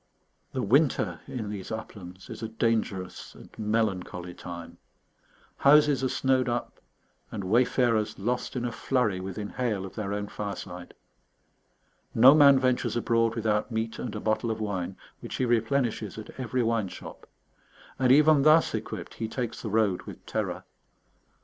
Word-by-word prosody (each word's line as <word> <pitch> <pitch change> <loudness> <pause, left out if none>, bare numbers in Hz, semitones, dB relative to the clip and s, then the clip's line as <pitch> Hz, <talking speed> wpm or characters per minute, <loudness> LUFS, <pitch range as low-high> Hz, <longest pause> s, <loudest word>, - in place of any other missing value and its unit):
The 130 - -2
winter 105 - +2
in 110 -5 -5
these 100 -3 -6
uplands 95 -4 -8
is - - -8
a 110 - -3
dangerous 110 -5 -2
and - - -14
melancholy 100 -5 -1
time. 85 -1 -9 0.8
Houses 145 -1 +5
are 130 - +1
snowed 130 -1 +1
up, 120 0 -3 0.5
and 100 - -5
wayfarers 115 +1 +2
lost 125 +6 -2
in 120 -1 -2
a 120 - -2
flurry 115 -5 0
within 95 +2 -5
hail 110 -7 -2
of 95 - -9
their 105 -3 -4
own 105 0 -2
fireside. 90 -4 -7 1.2
No 125 +5 +9
man 140 -2 +7
ventures 130 -1 +1
abroad 115 -1 +1
without 110 -1 0
meat 110 0 -2
and 115 -3 -4
a - - -3
bottle 110 +2 0
of 110 -1 -2
wine, 95 -3 -3 0.2
which - - -7
he 130 - 0
replenishes 115 -2 0
at 110 - -8
every 125 0 -1
wine 115 -3 +1
shop; - - -10 0.7
and 130 -1 +4
even 150 +1 +6
thus 155 +3 +5
equipped - - -5
he 110 - -4
takes 120 0 -4
the 110 - -4
road 105 -3 +2
with - - -10
terror. - - -3
110 Hz, 155 wpm, -27 LUFS, 100-125 Hz, 1.2 s, No